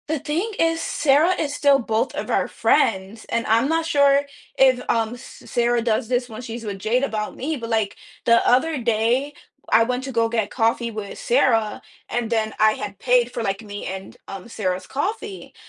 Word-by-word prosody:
The 315 0 -1
thing 340 +11 -2
is, 330 0 +2
Sarah 305 +5 +3
is 290 -2 -1
still 285 -1 +4
both 225 -2 -1
of - - -4
our - - +1
friends, 195 +1 +1
and 230 -1 -1
I'm 230 +4 +3
not 325 0 +1
sure 280 -3 +4 0.3
if, 260 -2 +5
um, 225 0 +1
S 245 - -12
Sarah 240 0 +1
does 225 -1 0
this 245 0 0
when 225 -1 -8
she's 230 -1 -7
with 200 -2 -5
Jade 240 +6 +1
about 215 -5 -3
me, 310 +5 -3
but, 230 -4 -6
like, 220 -3 0 0.3
the 235 0 +4
other 300 +5 +3
day, 235 +5 +1 0.4
I 230 - +5
went 250 +2 -2
to 270 - -5
go 230 -2 +2
get 225 -3 -1
coffee 230 0 0
with 210 -2 -7
Sarah, 230 -4 +2 0.3
and 240 -2 -2
then 220 -2 0
I 215 0 +5
had 200 -2 -7
paid 245 -1 +2
for, 245 - -4
like, 195 0 -2
me 205 -2 -7
and, 190 0 -7
um, 195 +3 -8
Sarah's 185 -5 -3
coffee, 400 +7 -4
235 Hz, 195 wpm, -22 LUFS, 220-275 Hz, 0.4 s, if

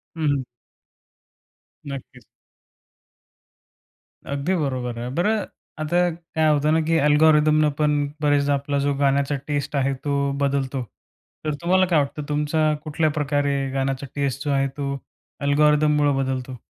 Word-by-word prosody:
हं, 160 - -4
हं. 140 -2 0 1.4
नक्कीच. 140 -1 -8 2.0
अगदी 140 +7 -1
बरोबर 130 -7 -2
आहे. 120 +1 -4
बरं 210 +4 +1 0.4
आता 175 +3 +2
काय 160 -1 -2
होत 145 0 0
ना, - - +3
की 165 0 +3
अल्गोरिदमनं 155 0 +4
पण 150 -1 +3 0.2
बरेचदा 145 -1 +2
आपला 140 0 -1
जो 145 - +2
गाण्याचा 140 +1 +2
टेस्ट 145 0 -2
आहे 135 0 +1
तो 140 -1 0
बदलतो. 135 -1 0 0.6
तर 155 - 0
तुम्हाला 185 +2 +3
काय 175 -4 +3
वाटतं, 145 +1 -2
तुमचा 150 +1 +1
कुठल्या 155 +1 0
प्रकारे 145 -1 0 0.2
गाण्याचा 135 0 -2
टेस्ट 140 -2 -2
जो 145 - 0
आहे 135 0 +2
तो 140 -1 -2 0.5
अल्गोरिदममुळं 150 0 +3
बदलतो? 130 -1 -2
145 Hz, 130 wpm, -23 LUFS, 140-155 Hz, 2.0 s, अल्गोरिदमनं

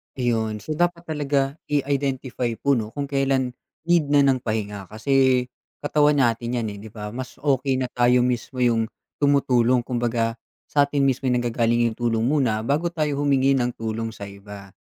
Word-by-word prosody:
Ayun, 110 -4 -1
so, - - -9
dapat 175 -1 +1
talaga 150 -4 0 0.3
i-identify 135 -3 -1
po, 140 +3 +1
'no, 110 +1 -5
kung 140 -1 -4
kailan 135 -2 +1 0.3
need 170 -2 +2
na 145 0 +4
ng 135 -2 +3
pahinga 105 -4 -4
kasi 130 +4 +2 0.4
katawan 150 0 +3
natin 120 0 0
yan, 115 -3 -1
eh, 100 - -8
'di 105 - -10
ba? 105 -1 -6
Mas 125 +2 -7
okey 135 -2 +1
na 130 -1 -2
tayo 125 0 +3
mismo 125 +1 -2
yung 115 -2 +2 0.3
tumutulong 130 -4 +3
kumbaga 120 -2 -1 0.3
sa 145 -1 +4
atin 140 0 0
mismo 135 0 +1
yung 125 -1 +2
nangagaling 120 0 +1
yung 110 - -11
tulong 115 -2 0
muna 125 -6 +1
bago 145 +8 0
tayo 150 -3 -1
humingi 135 -1 +3
ng 120 -1 -1
tulong 115 0 -4
sa 100 - -8
iba. 100 0 -12
125 Hz, 175 wpm, -23 LUFS, 115-140 Hz, 0.4 s, na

